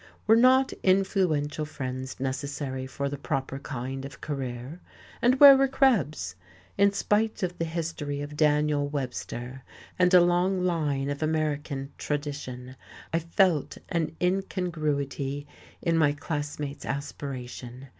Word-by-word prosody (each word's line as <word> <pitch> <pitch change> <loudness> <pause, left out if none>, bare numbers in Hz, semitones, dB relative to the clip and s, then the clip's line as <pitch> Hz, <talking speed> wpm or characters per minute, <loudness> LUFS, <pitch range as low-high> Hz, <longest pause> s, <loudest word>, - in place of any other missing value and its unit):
Were 220 - +6
not 260 +3 +5
influential 185 -6 +2
friends 130 -3 -5
necessary 130 0 -3
for 140 +1 -3
the 140 0 -5
proper 135 -2 -3
kind 135 -1 -5
of 140 -1 -9
career? 135 +1 -5 0.4
and 255 +2 +3
where 280 -1 +11
were 270 0 +4
Krebs's? 190 - +2 0.4
In 200 0 +4
spite 210 +1 0
of 180 -1 -1
the 165 - 0
history 160 -3 -3
of 145 +1 -6
Daniel 150 -1 +2
Webster 130 -2 -5 0.4
and 180 0 +5
a 180 - +8
long 180 +2 +2
line 145 -6 0
of 145 - -5
American 150 -3 -1
tradition, 140 -4 -4 0.4
I 165 - +3
felt 170 -1 +1
an 160 -2 -1
incongruity 155 -7 -1 0.4
in 165 -1 +2
my 145 -2 +4
classmate's 145 -1 -4
aspiration. 130 -2 -6
150 Hz, 125 wpm, -27 LUFS, 135-175 Hz, 0.4 s, where